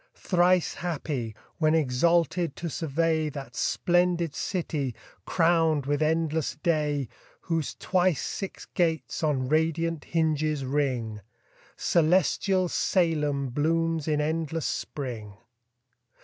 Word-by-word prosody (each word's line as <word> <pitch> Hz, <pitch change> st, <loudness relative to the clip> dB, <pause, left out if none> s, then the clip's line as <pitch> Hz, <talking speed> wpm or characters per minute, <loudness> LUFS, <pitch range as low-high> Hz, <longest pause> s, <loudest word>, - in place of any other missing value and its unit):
Thrice 180 Hz, -2 st, +2 dB
happy, 145 Hz, -9 st, -3 dB, 0.2 s
when 155 Hz, -1 st, +3 dB
exalted 165 Hz, +3 st, +2 dB
to 170 Hz, -2 st, -5 dB
survey 160 Hz, +1 st, 0 dB
That 135 Hz, -4 st, -8 dB
splendid 175 Hz, -1 st, +1 dB
city, 155 Hz, -, -2 dB, 0.3 s
crown'd 165 Hz, -4 st, +2 dB
with 145 Hz, +1 st, 0 dB
endless 160 Hz, -2 st, 0 dB
day, 150 Hz, -4 st, 0 dB, 0.3 s
Whose 165 Hz, -4 st, -2 dB
twice 185 Hz, -5 st, +1 dB
six 195 Hz, -, -5 dB
gates 165 Hz, -3 st, -1 dB
on 140 Hz, -5 st, 0 dB
radiant 160 Hz, +1 st, 0 dB
hinges 155 Hz, -3 st, 0 dB
ring: 130 Hz, -6 st, -1 dB, 0.6 s
Celestial 185 Hz, +2 st, +2 dB
Salem 150 Hz, -7 st, +1 dB
blooms 165 Hz, +3 st, 0 dB
in 150 Hz, -1 st, +1 dB
endless 160 Hz, +1 st, -1 dB
spring. 115 Hz, -8 st, -4 dB
160 Hz, 100 wpm, -27 LUFS, 145-170 Hz, 0.6 s, when